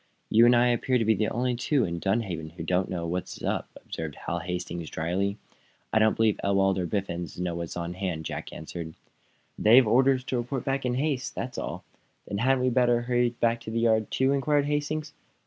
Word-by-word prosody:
"You 115 +2 +7
and 120 - +6
I 120 +1 +4
appear 125 +2 +1
to 115 - 0
be 110 - +4
the 105 +1 0
only 125 +1 0
two 130 +2 +1
in 85 -1 -3
Dunhaven 95 -5 -1
who 90 - -7
don't 90 +1 0
know 85 -2 -3
what 90 +2 -2
is - - -10
up," - - -1 0.2
observed 80 -3 -5
Hal 85 - -1
Hastings, 85 -2 -4
dryly. 95 +5 -1 0.6
"I 110 - +5
don't 110 0 +4
believe 110 -2 +2
Ewald 95 -1 +2
or 90 - -1
Biffens 90 -4 -3
know 90 -1 -1
what 85 0 -3
is 85 - -8
on 85 0 -3
hand," 90 -4 -3
Jack - - -5
answered. 80 +1 -7 0.6
"They've 120 +4 +7
orders 130 +3 +4
to 130 - -2
report 120 +2 -3
back 135 -1 0
in 125 - 0
haste. 135 -1 -1
That's 125 +2 -4
all." - - -5 0.4
"Then 100 - -3
hadn't 130 +2 +2
we 130 - +3
better 120 -1 +3
hurry 120 0 +2
back 115 0 0
to 110 - -7
the 115 +1 -1
yard, 110 -2 +2
too?" 130 +1 +2
inquired 140 +1 +2
Hastings. 150 +1 -2
110 Hz, 215 wpm, -27 LUFS, 90-125 Hz, 0.6 s, You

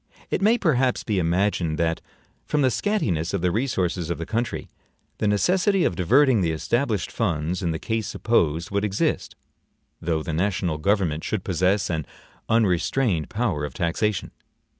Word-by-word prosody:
It - - 0
may 220 +4 +4
perhaps 135 - +1
be 105 -4 0
imagined 85 -2 +1
that, 80 -1 0 0.4
from 150 -2 0
the 130 - +3
scantiness 100 - 0
of 95 - -2
the 90 0 +2
resources 95 -7 -1
of 85 - -1
the 85 - -5
country, 115 +5 -3 0.5
the 105 - +1
necessity 180 - +2
of 90 - +1
diverting 125 - +4
the 85 - +1
established 110 - -1
funds 85 -5 -1
in 85 - -1
the 80 - -1
case 110 +3 -2
supposed 85 -7 0
would 100 +1 0
exist, 100 -1 -1 0.7
though 80 -2 -1
the 80 - -4
national 90 -2 0
government 85 -3 +1
should 105 -4 -2
possess 95 +2 +1
an 80 -3 -2 0.4
unrestrained 105 - +1
power 105 -10 -1
of 75 -4 -5
taxation. 90 +4 -1
95 Hz, 160 wpm, -24 LUFS, 85-115 Hz, 0.7 s, may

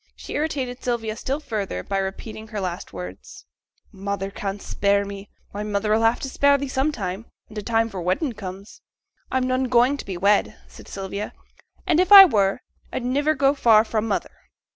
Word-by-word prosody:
She - - -9
irritated 270 -5 -2
Sylvia 225 -3 -2
still 270 +5 -3
further 205 - -4
by 195 - -2
repeating 215 +3 -6
her 215 -1 -5
last 180 -2 -5
words, 90 0 -9 0.5
'"Mother 195 0 -4
can't 195 0 -4
spare 200 0 0
me;" 200 0 -8 0.2
why, 205 - -5
mother 210 0 0
'll 225 - +1
have 225 +1 +3
to - - -3
spare 280 +1 +3
thee 280 0 -4
sometime, 230 -8 -2 0.2
when 215 - -16
t' 210 - -3
time 225 +1 +1
for 195 -5 -6
wedding 190 - -1
comes.' 195 -1 -9 0.5
'I'm 260 -1 +1
none 255 0 +1
going 250 +3 +3
to - - -8
be 190 -3 -5
wed,' 200 +3 +2
said - - -15
Sylvia; 200 +1 -5 0.5
'and 345 -3 +2
if 365 +2 +2
I 395 -1 +13
were, 200 - +1 0.3
I'd 245 - -4
niver 290 +5 +1
go 275 -1 +3
far 225 -6 +5
fra' 220 -1 -1
mother.' 210 -2 -2
215 Hz, 185 wpm, -23 LUFS, 195-260 Hz, 0.5 s, I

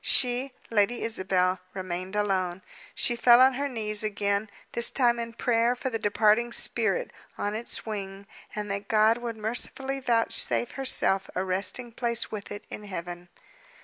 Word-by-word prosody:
She, 250 +1 +1 0.2
Lady 220 +2 +1
Isabel, 190 -4 +1 0.2
remained 185 +1 -5
alone. 190 -3 -1 0.3
She 240 - 0
fell 240 0 +6
on 260 +1 +6
her 280 +2 -2
knees 215 -4 -2
again, 200 0 -1 0.2
this 235 - +3
time 240 -3 +2
in 230 0 -5
prayer 235 +1 +1
for 260 +1 -4
the 225 - -2
departing 215 +3 +2
spirit, - - +1 0.3
on 205 - -2
its 225 +2 -2
wing, 200 -2 -6 0.3
and 210 -1 -4
that 200 0 -4
God 220 +1 +3
would 235 -2 -5
mercifully 255 +5 -2
vouchsafe 240 -1 +1
herself 225 -7 +3
a 185 - 0
resting 190 +6 0
place 235 0 -1
with 210 -2 -7
it 205 +1 -7
in 210 - -7
heaven. 175 -2 -7
215 Hz, 155 wpm, -27 LUFS, 200-240 Hz, 0.3 s, fell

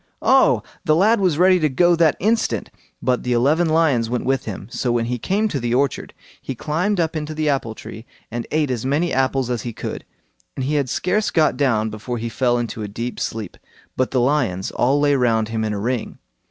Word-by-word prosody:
Oh! - - +4 0.2
the 155 - +3
lad 215 +6 +4
was 180 -6 +1
ready 185 +1 +5
to 155 -2 +2
go 175 +6 +3
that 165 -3 +3
instant; 220 +4 0 0.3
but 125 -1 +1
the 125 - -1
eleven 150 +8 +2
lions 150 -8 +2
went 125 0 -2
with 135 +1 0
him. 100 -2 -6
So 125 - -1
when 120 -1 +1
he 125 +1 -3
came 205 - 0
to 145 - -2
the 120 0 -1
orchard, 135 0 -1 0.3
he 135 - -5
climbed 175 - -1
up 165 -1 0
into 155 0 -4
the 155 -1 0
apple 125 -6 -1
tree 110 +2 -10 0.2
and 120 0 -4
ate 150 -3 0
as 120 -3 -2
many 145 +6 0
apples 130 -1 0
as 120 -3 -1
he 120 +1 -5
could, - - -6 0.5
and 130 - -3
he 145 - -1
had 140 -3 0
scarce 210 - 0
got 155 -3 +2
down 110 -6 +1
before 110 +3 -5
he 115 +1 -4
fell 120 +1 +1
into 115 -2 -4
a 105 - -3
deep 115 +4 -5
sleep; 110 -5 -4 0.4
but 130 - 0
the 130 - 0
lions 120 -9 0
all 135 +4 +2
lay 145 0 +3
round 115 -5 +2
him 110 -1 -2
in 110 - -1
a 105 - -3
ring. 120 +2 -3
130 Hz, 220 wpm, -21 LUFS, 120-155 Hz, 0.5 s, ready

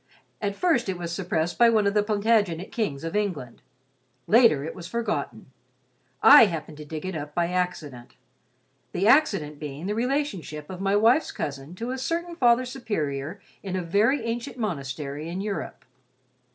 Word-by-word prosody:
At 200 -1 -2
first 255 - +1
it 185 - -2
was 170 -1 -5
suppressed 170 -2 -2
by 235 -1 +7
one 220 -2 +3
of 200 - +2
the 210 - +3
Plantagenet 205 -4 +1
kings 160 -12 -2
of 165 +3 -4
England. 180 - -3 0.6
Later 225 - +5
it 160 - -5
was 170 -2 -9
forgotten. 235 -1 -3 0.7
I 290 -5 +10
happened 160 -3 -6
to 150 - -9
dig 155 +3 -6
it 185 -2 -4
up 150 -1 -6
by 170 -1 +1
accident. 160 -9 -4 0.8
The 185 - 0
accident 195 - +3
being 150 +2 -6
the 205 - -1
relationship 225 - -2
of 185 0 -7
my 195 +1 +1
wife's 230 +9 +3
cousin 140 +3 -6
to 230 +6 -4
a 260 - -4
certain 340 +5 -3
Father 245 -4 +3
Superior 175 - -4 0.2
in 190 -2 -4
a 185 - -2
very 215 +10 +2
ancient 240 +4 -4
monastery 150 - -4
in 180 +2 -4
Europe. 200 0 -5
195 Hz, 165 wpm, -25 LUFS, 155-230 Hz, 0.8 s, I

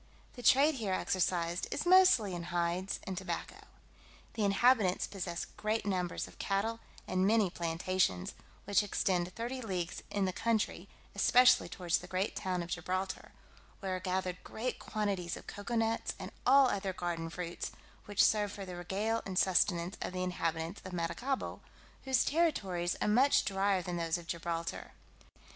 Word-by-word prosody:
The 245 - -9
trade 275 +6 +5
here 195 -3 0
exercised 175 -2 0
is 290 - -2
mostly 360 - +6
in 170 -1 -4
hides 175 +2 -1
and 190 - -4
tobacco. 190 +1 -5 0.7
The 220 - -1
inhabitants 200 -1 +3
possess 175 -3 -4
great 215 +1 -2
numbers 180 -3 -1
of - - -17
cattle, 215 +3 -1 0.3
and 185 +1 +2
many 215 -4 +3
plantations, 170 - 0 0.3
which 200 0 +3
extend 185 -3 0
thirty 245 +3 -4
leagues 180 -6 -3
in 200 -1 0
the 185 - -1
country, 225 0 -1 0.2
especially 250 0 +5
towards 175 -2 0
the - - -10
great 190 +2 -1
town 185 -4 -2
of 170 - -9
Gibraltar, 185 +2 -3 0.5
where 190 -2 -2
are - - -3
gathered 185 -1 -2
great 250 +3 -4
quantities 200 -5 -2
of - - -12
cocoa 205 +4 -5
nuts, 225 0 0
and - - -7 0.2
all 275 +1 +7
other 195 -4 -1
garden 170 -2 -3
fruits, 170 0 -5 0.3
which 205 -1 +3
serve 210 -2 +2
for 200 -1 -7
the 180 -1 -7
regale 205 +6 -1
and 190 -2 -5
sustenance 180 -1 +2
of - - -3
the 185 0 -2
inhabitants 165 0 -2
of 185 - -8
Maracaibo, 180 +11 -2 0.4
whose 265 -3 +3
territories 195 - +1
are - - +1
much 255 +7 +4
drier 195 -1 +1
than 175 0 -3
those 165 0 0
of 175 - -10
Gibraltar. 170 0 -4
190 Hz, 160 wpm, -33 LUFS, 175-215 Hz, 0.7 s, all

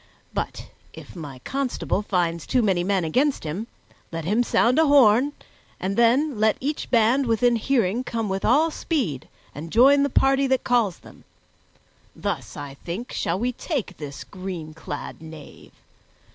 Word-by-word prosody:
But - - -4 0.2
if - - -12
any 145 -6 -8
constable 270 - -2
finds 170 -5 -1
too 250 -2 +2
many 190 -4 +2
men 190 -1 +1
against 260 - +1
him, 170 +9 -4 0.4
let 165 -1 -5
him 210 +7 +2
sound 245 +3 +3
a 320 - +4
horn, 265 -1 +5 0.5
and 195 +1 -2
then 240 +3 +3
let 215 0 +3
each 290 +3 -3
band 240 +3 +3
within 235 +1 +3
hearing 235 -2 +1
come 225 -3 -3
with 190 0 -3
all 310 +7 +3
speed 240 - -2 0.3
and 160 +3 -8
join 275 +5 +6
the 280 - +2
party 270 +1 +3
that 260 -1 +1
calls 235 -7 +1
them. - - -16 0.9
Thus, - - -4
I 140 -1 -7
think, 190 +9 -5
shall 170 - -1
we 245 +5 0
take 250 - -4
this 140 -3 -7
green 180 -5 -7
clad 160 - -7
knave. 160 -2 -12
220 Hz, 160 wpm, -24 LUFS, 175-260 Hz, 0.9 s, join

